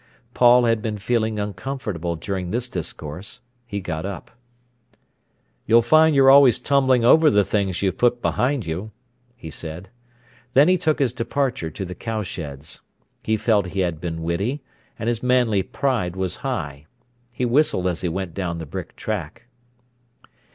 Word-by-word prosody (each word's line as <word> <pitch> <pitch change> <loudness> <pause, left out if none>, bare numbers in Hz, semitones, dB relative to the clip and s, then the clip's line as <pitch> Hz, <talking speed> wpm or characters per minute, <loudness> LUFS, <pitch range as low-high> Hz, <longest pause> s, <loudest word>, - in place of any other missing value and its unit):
Paul 125 0 +5
had 115 -2 +2
been 105 -1 -3
feeling 110 +1 -1
uncomfortable 105 - -4
during 90 +2 -4
this 120 +5 -1
discourse. 90 +2 -6 0.3
He 100 -3 -4
got 80 -4 -4
up. 95 -2 -7 1.4
"You'll 115 +1 +5
find 155 +5 +5
you're 135 -1 +7
always 135 -4 +7
tumbling 130 -4 +2
over 155 +5 +6
the 105 -1 +3
things 100 -3 -1
you've 95 -2 -1
put 120 0 +3
behind 130 0 0
you," 90 +7 -4 0.5
he 80 -9 -9
said. 85 +5 -8 0.7
Then 140 +4 +7
he 185 - +5
took 160 -4 +1
his 130 -4 +1
departure 125 - -2
to 95 +5 -6
the 90 - -6
cowsheds. 85 - -6 0.4
He 110 0 0
felt 105 -4 +2
he - - +2
had 85 -4 -2
been 80 -2 -4
witty, 100 - -2 0.3
and 115 - -4
his 120 -1 0
manly 125 -5 +2
pride 95 -3 -1
was 95 -2 -3
high. 70 +1 -4 0.4
He 125 +1 -2
whistled 120 -7 +2
as 90 -2 -1
he 90 - -1
went 95 0 -4
down 90 -3 -3
the 80 - -6
brick 70 - -7
track. - - -5
105 Hz, 160 wpm, -22 LUFS, 90-125 Hz, 1.4 s, you're